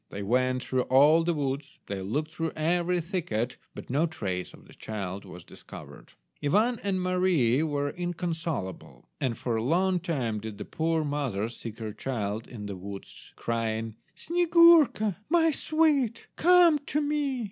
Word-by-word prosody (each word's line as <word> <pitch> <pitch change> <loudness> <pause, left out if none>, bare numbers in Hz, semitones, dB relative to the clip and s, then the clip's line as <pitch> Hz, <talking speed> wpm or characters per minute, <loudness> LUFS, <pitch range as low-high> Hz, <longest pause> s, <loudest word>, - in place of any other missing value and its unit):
They 100 - -6
went 125 +4 +1
through 130 -1 0
all 145 +5 +5
the 170 0 0
woods, 140 0 -3
they 100 -1 -4
looked 145 +11 -2
through 165 -2 -3
every 175 +3 +1
thicket, 155 - -2 0.2
but - - -8
no 150 +6 +2
trace 95 - -4
of - - -16
the - - -16
child 100 -3 -6
was 90 -2 -10
discovered. - - -12 0.3
Ivan 215 +11 +2
and 195 -2 -1
Mary 180 -9 +2
were 145 -2 -1
inconsolable, 165 - -4
and 120 -4 -1
for 120 -3 -1
a 110 - -1
long 180 +7 +2
time 130 -11 -2
did 110 -1 -7
the - - -6
poor 160 -1 0
mother 140 -8 -2
seek 115 -1 -8
her 110 -3 -5
child 110 -2 -3
in 110 -4 -8
the 100 -1 -5
woods, 100 +1 -10
crying— 115 -1 -2 0.2
"Snyegurka, 335 - +4
my 325 -1 +4
sweet, 295 -7 +1
come 345 -2 +6
to 290 +1 -2
me." 290 -3 -1
150 Hz, 160 wpm, -28 LUFS, 115-185 Hz, 0.3 s, come